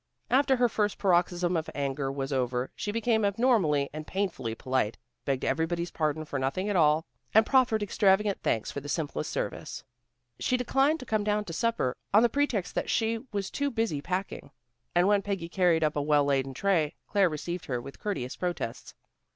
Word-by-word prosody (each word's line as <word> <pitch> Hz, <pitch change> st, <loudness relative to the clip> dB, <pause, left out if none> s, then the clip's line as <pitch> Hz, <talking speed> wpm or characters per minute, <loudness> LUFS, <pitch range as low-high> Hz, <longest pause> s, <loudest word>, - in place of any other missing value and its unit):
After 270 Hz, +1 st, +4 dB
her 245 Hz, -1 st, +3 dB
first 210 Hz, -3 st, -1 dB
paroxysm 175 Hz, -1 st, +2 dB
of 160 Hz, -1 st, -2 dB
anger 140 Hz, -1 st, -2 dB
was 135 Hz, 0 st, -3 dB
over, 125 Hz, -1 st, -1 dB
she 205 Hz, -, -3 dB
became 225 Hz, 0 st, +1 dB
abnormally 200 Hz, -, +2 dB
and 155 Hz, 0 st, -7 dB
painfully 175 Hz, -, -2 dB
polite, 130 Hz, -3 st, -1 dB, 0.3 s
begged 135 Hz, -2 st, -1 dB
everybody's 170 Hz, +1 st, -1 dB
pardon 155 Hz, 0 st, -1 dB
for 140 Hz, -2 st, -3 dB
nothing 135 Hz, +9 st, -1 dB
at 205 Hz, -, 0 dB
all, 155 Hz, -1 st, +4 dB, 0.3 s
and 220 Hz, 0 st, +7 dB
proffered 245 Hz, -5 st, +3 dB
extravagant 200 Hz, 0 st, +2 dB
thanks 110 Hz, -, 0 dB
for -, -, -4 dB
the 145 Hz, -, -8 dB
simplest 145 Hz, +1 st, -2 dB
service. -, -, -4 dB, 0.6 s
She 255 Hz, -, +1 dB
declined 270 Hz, +5 st, +2 dB
to -, -, -8 dB
come 215 Hz, -3 st, 0 dB
down 210 Hz, 0 st, 0 dB
to 165 Hz, -, -6 dB
supper 225 Hz, -, 0 dB, 0.2 s
on 215 Hz, -, +7 dB
the 240 Hz, -, +4 dB
pretext 235 Hz, -9 st, 0 dB
that -, -, -2 dB
she 225 Hz, 0 st, +1 dB
was 200 Hz, -2 st, -3 dB
too 285 Hz, 0 st, -1 dB
busy 225 Hz, -, -1 dB
packing. 185 Hz, +1 st, -4 dB, 0.5 s
And 175 Hz, +2 st, +4 dB
when 205 Hz, -1 st, +4 dB
Peggy 195 Hz, -4 st, -3 dB
carried 175 Hz, -3 st, +2 dB
up 155 Hz, -1 st, +1 dB
a 145 Hz, -, 0 dB
well 145 Hz, 0 st, +3 dB
laden 135 Hz, -1 st, 0 dB
tray, 165 Hz, -4 st, +1 dB
Claire 200 Hz, -3 st, +3 dB
received 165 Hz, +3 st, -5 dB
her 125 Hz, -6 st, -2 dB
with 135 Hz, +3 st, -10 dB
courteous 160 Hz, -12 st, -3 dB
protests. 175 Hz, -10 st, -4 dB
180 Hz, 185 wpm, -28 LUFS, 145-210 Hz, 0.6 s, and